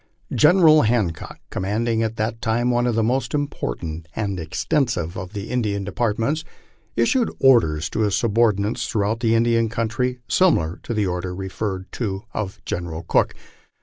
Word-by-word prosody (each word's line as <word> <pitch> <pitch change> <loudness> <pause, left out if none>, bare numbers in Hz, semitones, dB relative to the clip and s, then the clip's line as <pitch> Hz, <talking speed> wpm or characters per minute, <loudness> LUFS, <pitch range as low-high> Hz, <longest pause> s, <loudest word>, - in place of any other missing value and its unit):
Genera] 155 -1 +6
Hancock, 105 -9 -1
commanding 110 +4 0
at 110 0 -1
that 110 +1 -2
time 120 +2 +1
one 120 0 +2
of 120 - 0
the 115 - +2
most 130 +6 0
important 80 - -4
and 100 -4 -2
extensive 85 - -1
of 95 +2 -7
the 100 -1 -5
Indian 105 -5 -1
departments, 115 - -1 0.5
issued 230 - +2
orders 85 - +4
to 80 - -4
his 105 -3 +2
subordinates 115 0 +1
throughout 110 +1 0
the 115 -2 +2
Indian 115 0 +2
country, 115 +3 -1
similar 90 - +2
to 120 - -4
the 105 -1 +1
order 90 0 -3
referred 95 0 -4
to 100 -4 -3
of 100 -2 -4
General 85 -4 -4
Cooke. - - +1
110 Hz, 150 wpm, -22 LUFS, 95-120 Hz, 0.5 s, Genera